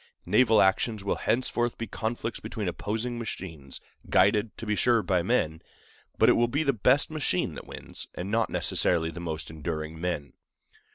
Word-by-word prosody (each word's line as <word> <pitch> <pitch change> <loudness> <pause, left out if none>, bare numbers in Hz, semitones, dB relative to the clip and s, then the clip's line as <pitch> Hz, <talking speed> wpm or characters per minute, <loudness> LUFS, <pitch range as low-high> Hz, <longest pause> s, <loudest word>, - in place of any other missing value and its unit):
Naval 115 -4 +5
actions 100 +2 +1
will 100 - 0
henceforth 120 0 0
be 115 - -3
conflicts 115 +1 -3
between 105 -3 -4
opposing 110 +8 -2
machines, 80 - -6 0.3
guided, 105 +1 +3
to - - -6
be 105 - 0
sure, 115 0 +3
by 90 -3 +2
men; 80 -6 0 0.6
but - - +5
it - - +8
will 120 - +3
be 140 +6 0
the 140 -2 +2
best 125 +7 +3
machine 150 - 0
that - - -9
wins, - - -8
and 95 +3 -4
not 115 0 +2
necessarily 80 -2 +1
the 85 - -8
most 80 -2 -5
enduring 80 0 -5
men. 85 -5 -3
105 Hz, 170 wpm, -28 LUFS, 85-120 Hz, 0.6 s, it